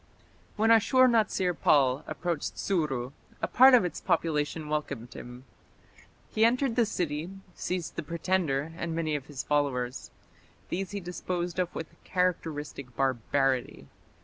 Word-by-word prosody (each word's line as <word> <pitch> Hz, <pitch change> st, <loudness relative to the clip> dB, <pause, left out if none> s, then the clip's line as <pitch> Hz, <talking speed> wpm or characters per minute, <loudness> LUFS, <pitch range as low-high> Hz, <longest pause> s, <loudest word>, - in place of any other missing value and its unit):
When 225 Hz, +1 st, +3 dB
Ashur 255 Hz, +3 st, +6 dB
natsir 215 Hz, -6 st, +2 dB
pal 135 Hz, -4 st, +3 dB
approached 170 Hz, -4 st, -3 dB
Suru, 135 Hz, -9 st, -1 dB, 0.3 s
a -, -, -1 dB
part 260 Hz, +1 st, +7 dB
of 235 Hz, -, +4 dB
its 175 Hz, -, -4 dB
population 155 Hz, -1 st, 0 dB
welcomed 140 Hz, -5 st, -3 dB
him. 125 Hz, +1 st, -10 dB, 0.9 s
He 220 Hz, -, +3 dB
entered 245 Hz, +1 st, +3 dB
the 235 Hz, -3 st, +3 dB
city, 165 Hz, -4 st, -2 dB, 0.2 s
seized 175 Hz, -2 st, -4 dB
the -, -, 0 dB
pretender 165 Hz, -2 st, -1 dB
and 165 Hz, -1 st, -3 dB
many 155 Hz, -2 st, -1 dB
of 140 Hz, -2 st, -5 dB
his 145 Hz, -3 st, -5 dB
followers. 135 Hz, -4 st, -1 dB, 0.6 s
These 190 Hz, +1 st, -2 dB
he 205 Hz, -, -4 dB
disposed 180 Hz, 0 st, -4 dB
of 180 Hz, -1 st, -1 dB
with 160 Hz, -, -8 dB
characteristic 150 Hz, -8 st, -2 dB
barbarity. 130 Hz, -, 0 dB
165 Hz, 135 wpm, -29 LUFS, 140-185 Hz, 0.9 s, part